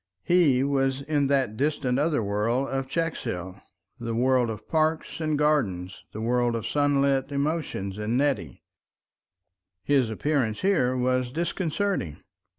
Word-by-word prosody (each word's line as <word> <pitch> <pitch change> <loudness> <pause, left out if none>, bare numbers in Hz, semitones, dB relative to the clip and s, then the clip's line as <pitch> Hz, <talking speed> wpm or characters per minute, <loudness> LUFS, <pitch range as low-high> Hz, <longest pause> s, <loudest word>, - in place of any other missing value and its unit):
He 155 -8 +4
was 135 -1 0
in 145 -1 +1
that 135 -6 +1
distant 135 -1 0
other 150 -5 +1
world 110 +6 0
of 135 0 -2
Checkshill, 100 - -3 0.4
the 115 -1 -3
world 125 0 +2
of 110 -1 -7
parks 160 0 0
and 155 -1 0
gardens, 105 -12 0
the 110 - -6
world 120 +1 +1
of 115 - -3
sunlit 140 -1 +1
emotions 140 - -2
and 110 +3 0
Nettie. 125 - -1 1.2
His 135 -1 +2
appearance 115 -2 -1
here 145 -10 +2
was 125 0 0
disconcerting. 170 - -2
135 Hz, 130 wpm, -26 LUFS, 115-150 Hz, 1.2 s, He